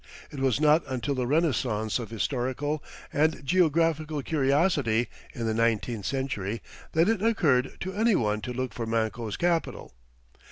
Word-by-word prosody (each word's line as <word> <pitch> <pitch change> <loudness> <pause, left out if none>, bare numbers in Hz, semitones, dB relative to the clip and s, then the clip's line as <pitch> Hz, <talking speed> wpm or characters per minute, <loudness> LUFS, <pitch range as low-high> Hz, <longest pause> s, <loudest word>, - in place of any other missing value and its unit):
It 145 - -7
was 135 -1 +2
not 155 +2 +5
until 130 +1 -2
the 125 -2 -1
renaissance 125 -8 +1
of 115 - -6
historical 130 +6 -2 0.3
and 155 -1 +1
geographical 160 -2 +2
curiosity, 140 -5 +2 0.3
in 115 - -3
the 110 - 0
nineteenth 115 -2 0
century, 115 -6 -3 0.3
that 165 +2 +4
it 220 -3 +1
occurred 155 - +2
to 190 +1 -4
any 220 +1 +3
one 105 -4 0
to 125 - -5
look 130 0 -3
for 115 -2 -4
Manco's 110 -1 -1
capital. 170 - -1
135 Hz, 150 wpm, -27 LUFS, 115-160 Hz, 0.3 s, not